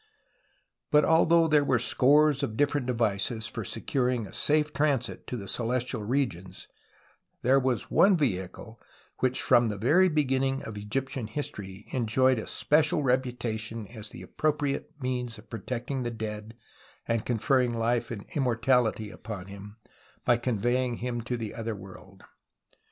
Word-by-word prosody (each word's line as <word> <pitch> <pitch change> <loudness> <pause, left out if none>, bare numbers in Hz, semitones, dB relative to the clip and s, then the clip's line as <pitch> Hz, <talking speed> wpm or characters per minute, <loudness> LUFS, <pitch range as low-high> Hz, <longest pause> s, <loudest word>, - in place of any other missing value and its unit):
But 150 0 +5
although 165 0 +4
there 150 -2 +4
were 130 -3 +2
scores 145 +4 +4
of 110 - -3
different 145 -3 +1
devices 110 -2 +1
for - - -3
securing 125 -4 -1
a - - -12
safe 150 0 +1
transit 140 -5 -1
to 125 - -4
the 100 -3 -7
celestial 120 +2 -2
regions, 95 -7 -2 0.8
there 130 +3 +5
was 130 -4 -1
one 195 -1 +5
vehicle 110 - -3 0.4
which 130 0 +1
from 120 -2 +4
the 105 - -4
very 160 - +4
beginning 135 -3 0
of 110 - -7
Egyptian 115 +3 -3
history 105 -7 -6
enjoyed 130 +1 +2
a - - -6
special 150 0 +2
reputation 120 -4 -1
as 110 -2 -7
the - - -10
appropriate 145 -2 -1
means 125 -3 -3
of 105 +1 -16
protecting 125 +3 -4
the 120 - -2
dead 110 -1 -6 0.5
and 115 -1 0
conferring 125 +1 +1
life 115 +1 0
and 105 -4 -6
immortality 120 -4 +1
upon 105 -5 -7
him 100 +2 -10 0.5
by 120 - +5
conveying 120 +1 0
him 120 -1 -3
to 120 +2 -3
the 110 -3 -5
other 115 -1 -4
world. 95 0 -13
120 Hz, 145 wpm, -28 LUFS, 110-135 Hz, 0.8 s, But